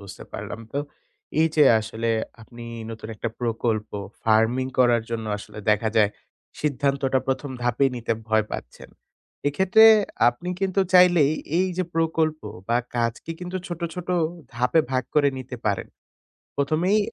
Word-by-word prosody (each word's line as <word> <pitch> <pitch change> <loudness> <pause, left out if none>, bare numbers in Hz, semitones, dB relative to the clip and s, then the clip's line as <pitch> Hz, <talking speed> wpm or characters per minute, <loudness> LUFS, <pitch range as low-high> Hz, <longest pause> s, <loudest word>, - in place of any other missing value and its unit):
বুঝতে 100 -2 -10
পারলাম - - -6
তো। 140 - -1 0.6
এই 160 - +4
যে 150 - +6 0.2
আসলে 110 +1 -4 0.3
আপনি 120 +1 -12 0.3
নতুন 110 -1 -8
একটা 115 +2 -3
প্রকল্প 115 -2 -1 0.3
ফারমিং 115 +4 +3
করার 120 -2 +4
জন্য 115 -1 -3
আসলে 105 0 -11
দেখা 105 +1 +2
যায় 105 -2 +5 0.5
সিদ্ধান্তটা 140 -2 +1
১ম 135 +1 -2
ধাপেই 120 +3 +2
নিতে 115 -1 -1 0.2
ভয় 110 -1 +3
পাচ্ছেন। - - -8 0.6
এক্ষেত্রে 190 +8 +5 0.4
আপনি 120 +9 -4
কিন্তু 195 0 +1
চাইলেই 175 -5 +6 0.3
এই 185 +1 +2
যে 185 - +1
প্রকল্প 160 -1 +1 0.3
বা 120 - +3 0.2
কাজকে 115 +6 -2
কিন্তু 180 +1 -4
ছোট, 175 -1 -6
ছোট 180 -1 -7 0.5
ধাপে 125 +6 +3
ভাগ 130 -1 +1
করে 145 -2 +5
নিতে 130 0 -7
পারেন। 100 -3 -1 0.7
১ম 140 +2 0
এই 215 - +5
130 Hz, 145 wpm, -24 LUFS, 115-155 Hz, 0.7 s, যে